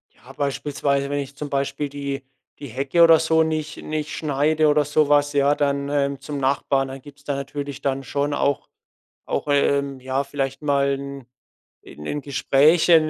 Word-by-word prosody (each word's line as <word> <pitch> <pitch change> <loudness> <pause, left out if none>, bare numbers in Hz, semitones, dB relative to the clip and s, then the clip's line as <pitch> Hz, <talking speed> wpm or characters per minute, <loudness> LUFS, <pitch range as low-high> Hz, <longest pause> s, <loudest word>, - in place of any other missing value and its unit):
Ja, 125 +3 -15
beispielsweise 140 0 -1
wenn 145 0 -1
ich 140 0 -6
zum 145 +1 -6
Beispiel 140 +1 -2
die 140 -1 -5 0.3
die 145 - -7
Hecke 135 +7 +2
oder 165 -1 +7
so 160 0 +3
nicht 155 -1 -3
nicht 155 -1 -3
schneide 155 +1 +1
oder 150 0 +4
so 150 +1 +2
was, 145 0 +3
ja, 145 0 +3
dann, 140 -1 0
ähm, 140 -1 0
zum 145 +1 -5
Nachbarn, 135 0 +1
dann 135 0 -8
gibt's 145 +1 -15
da 145 -1 -2
natürlich 140 0 -5
dann 135 0 -1
schon 145 +2 -1
auch 140 -1 0 0.6
auch, - - -2
ähm, 140 -1 +1
ja, 130 +2 -1
vielleicht 135 -1 -3
mal 140 -1 +2
'n 140 -2 -8 0.6
'n 75 - -11
'n 145 - -2
Gesprächen 155 +4 +4
140 Hz, 175 wpm, -23 LUFS, 140-150 Hz, 0.6 s, oder